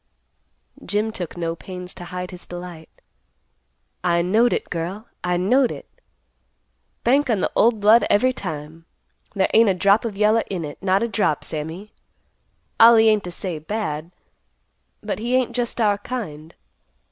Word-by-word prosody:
Jim 210 +2 -1
took 175 -5 -7
no 165 -1 -2
pains 180 +1 -8
to 175 - -10
hide 180 +1 -6
his 180 -1 -10
delight. 175 -2 -9 1.1
"I 170 -1 +2
knowed 220 +7 +3
it, - - -2
girl. 180 +6 -4 0.2
I 180 0 0
knowed 245 +8 +3
it. - - -9 1.2
Bank 275 +3 +3
on 220 -4 +2
the - - -1
old 225 -1 +3
blood 220 +3 +5
every 255 +5 +3
time. 160 - -7 0.5
There 190 -1 +2
ain't 225 -1 +6
a 190 - +2
drop 200 +3 +3
of 220 -4 -4
yeller 215 +2 +3
in 180 -5 -3
it; 145 - -9
not 195 +2 +2
a - - 0
drop, 200 -9 0
Sammy. 160 +7 -6 0.9
Ollie 225 -1 +8
ain't 215 -2 +2
to 175 - -5
say 175 -2 -4
bad, 160 -3 -4 0.9
but 210 -1 -3
he 240 +3 0
ain't 250 -2 0
just 240 -1 -2
our 205 -3 +2
kind. 165 -11 -6
195 Hz, 160 wpm, -22 LUFS, 175-225 Hz, 1.2 s, Ollie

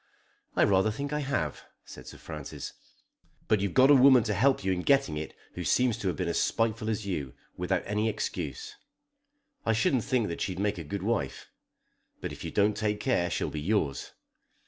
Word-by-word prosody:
"I - - +4
rather 95 +1 +4
think 140 +7 -4
I 150 - 0
have," 130 - -2 0.2
said - - -11
Sir - - -10
Francis. 75 -3 -7 0.7
"But 110 - +3
you've 100 -3 -2
got 130 +2 +7
a - - +9
woman 130 -2 +7
to 110 -2 -1
help 130 +3 +2
you 95 - +1
in 90 -1 0
getting 135 - +2
it 75 +1 -5 0.2
who 90 - -5
seems 125 +6 +2
to 100 - -2
have 90 - -1
been 90 - -1
as 85 - +1
spiteful 110 -1 0
as 110 -1 -2
you, 75 -10 -4 0.2
without 90 +1 -1
any 105 +2 0
excuse. 425 - -4 0.9
I 115 - +2
shouldn't 115 +2 +2
think 125 -4 +1
that 85 - -5
she'd 95 -2 -2
make 100 -1 -1
a - - -5
good 95 +5 -5
wife. 100 - -2 0.7
But - - -5
if - - -9
you - - -3
don't 105 +1 +2
take 105 -1 -1
care 90 -10 +1
she'll - - -2
be 75 - -4
yours." 80 -6 -1
105 Hz, 200 wpm, -29 LUFS, 90-125 Hz, 0.9 s, a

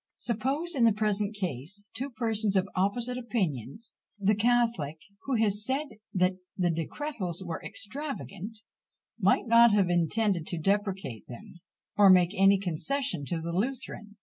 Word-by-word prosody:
Suppose, 270 +9 -1
in 255 - +1
the 225 -2 +6
present 210 0 0
case, 185 +2 -4
two 260 +5 -4
persons 220 -4 0
of 190 0 +2
opposite 235 +7 0
opinions. 205 - -3 0.3
The 200 +1 +3
catholic, 225 -9 +1 0.3
who 270 - 0
had 220 -3 +3
said 265 +8 0 0.2
that 185 0 +1 0.2
the 175 -2 +2
decretals 180 - -4
were 165 -2 -4
extravagant, 220 - -6 0.6
might 195 +3 +3
not 235 0 +7
have 195 -4 +3
intended 175 +1 +1
to 175 - -3
depreciate 195 - -1
them, 125 +8 -11 0.4
or 205 -1 +7
make 180 0 +5
any 195 0 +5
concession 190 - -2
to 170 +3 -2
the 170 +1 -4
Lutheran. 210 0 -3
205 Hz, 145 wpm, -29 LUFS, 180-235 Hz, 0.6 s, not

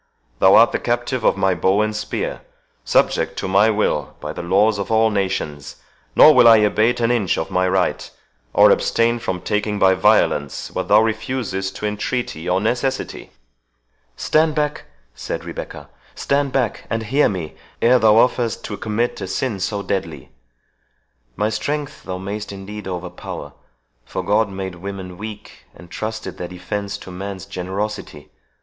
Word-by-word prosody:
Thou 95 +1 +6
art 115 +1 +7
the - - -1
captive 120 0 -1
of - - +3
my 95 -1 +2
bow 95 +4 +2
and 110 0 -2
spear—subject 105 - -2
to - - -3
my 100 +3 +4
will 105 -10 0
by - - -5
the - - -6
laws 100 +4 +2
of 100 - -3
all 110 0 +4
nations; 95 -8 -3 0.4
nor 155 - +9
will 120 - +7
I 115 -1 +9
abate 110 +3 +2
an 115 0 +2
inch 105 -8 +1
of 80 - -3
my 95 0 +2
right, 95 -1 0 0.4
or - - +6
abstain 115 +1 +2
from 90 -5 -3
taking 105 0 -1
by 95 -1 +5
violence 95 -8 +1
what - - -3
thou 105 +2 +6
refusest 110 -4 -2
to - - -5
entreaty 105 -4 -3
or 90 +1 +2
necessity." 125 +5 -2 0.9
"Stand 155 0 +2
back," 150 -1 -1 0.3
said - - -5
Rebecca—"stand 140 -1 -4
back, 125 -5 -1
and 115 -1 -1
hear 135 +7 +2
me 85 -6 -5 0.3
ere 125 +2 +5
thou 110 -2 +5
offerest 120 0 +2
to 105 - -5
commit 110 +2 -2
a 95 - -4
sin 105 +2 -2
so 100 +1 -2
deadly! 100 -2 -4 1.0
My 105 +2 0
strength 145 +5 -4
thou 90 - -4
mayst 100 +3 -5
indeed 100 +1 -8
overpower 90 -1 -6 0.5
for 95 - -5
God 105 +3 +2
made 95 -1 -5
women 90 0 -7
weak, 105 0 -9
and 85 - -15
trusted 110 +3 -5
their 90 - -4
defence 100 +3 -5
to 95 - -11
man's 95 +1 -6
generosity. 95 -4 -5
105 Hz, 155 wpm, -20 LUFS, 95-115 Hz, 1.0 s, nor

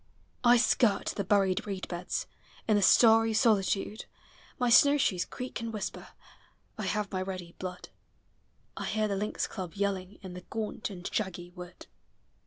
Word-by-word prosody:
I 240 0 +7
skirt 230 -3 +2
the 200 - -1
buried 195 -1 +2
reed 195 -2 -4
beds, 175 0 -3 0.4
In 215 - +4
the 205 - +3
starry 225 +2 +6
solitude: 210 -1 +1 0.5
My 250 - +1
snowshoes 275 -9 +5
creak 250 -2 -6
and 230 0 -4
whisper, 215 -3 -5 0.7
I - - -4
have 210 -1 -1
my 185 -1 -2
ready 185 -2 -6
blood. 180 -1 -6 0.9
I - - -5
hear 215 -1 0
the 200 - -1
lynx 210 +2 -2
club 185 -5 -7
yelling 200 -1 -2
In 185 -2 -7
the 180 - -8
gaunt 215 +3 -4
and 180 -3 -7
shaggy 175 -4 -3
wood. 180 0 -11
200 Hz, 155 wpm, -30 LUFS, 185-220 Hz, 0.9 s, I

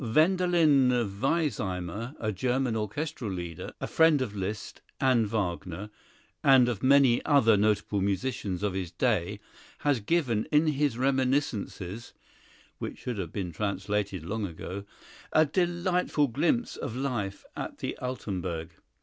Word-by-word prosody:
Wendelin 155 0 +4 0.3
Weissheimer, 115 - -1
a 110 -1 -1
German 125 +4 0
orchestral 115 +4 -3
leader, 85 -3 -5
a - - -3
friend 160 -2 +4
of 105 -4 -6
Liszt 100 +1 -5 0.2
and 125 -4 +3
Wagner, 95 -1 -3 0.5
and 130 -3 +6
of 120 -4 -2
many 135 -2 +5
other 125 -7 +5
notable 105 -1 +1
musicians 100 -1 -1
of 105 -2 0
his 95 -2 -3
day, 100 0 0 0.4
has 145 -4 +2
given 120 -3 +1
in 150 +1 +4
his 145 -5 +1
reminiscences 125 -6 -1 0.7
(which - - -5
should 120 -5 -4
have 85 -4 -4
been 95 -4 -3
translated 100 -1 -2
long 105 +3 -2
ago) 95 +4 -7 0.5
a 155 - +6
delightful 175 -1 +1
glimpse 165 - 0
of 110 - -5
life 120 -7 -3
at - - -5
the - - -4
Altenburg. 90 -10 -4
115 Hz, 130 wpm, -28 LUFS, 100-140 Hz, 0.7 s, and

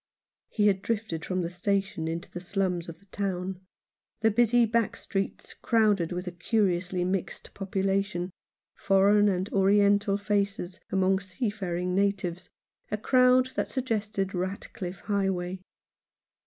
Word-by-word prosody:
He 210 - +1
had 195 -2 +3
drifted 210 -8 -2
from 185 -1 -1
the 170 - -2
station 195 -2 -1
into 165 +1 -4
the - - -5
slums 180 -2 -1
of 165 - -9
the 200 - -25
town 190 -1 -3 0.3
— - - -57
the 220 0 +4
busy 240 +2 +4
back 230 0 +1
streets, 195 0 -4
crowded 210 -7 +2
with 180 +1 -3
a 180 - -4
curiously 180 -1 0
mixed 185 0 -3
population, 195 -1 -1 0.4
foreign 200 +1 +4
and 185 0 -1
oriental 200 +1 +4
faces 200 -3 -1
among 190 0 +3
seafaring 190 -3 -3
natives, 190 -3 0 0.4
a 210 - -1
crowd 255 +3 +4
that - - -2
sug 260 -2 -2
gested 205 -4 -1
Ratcliffe 185 0 -4
Highway. 190 -3 -1
195 Hz, 135 wpm, -28 LUFS, 180-205 Hz, 0.4 s, the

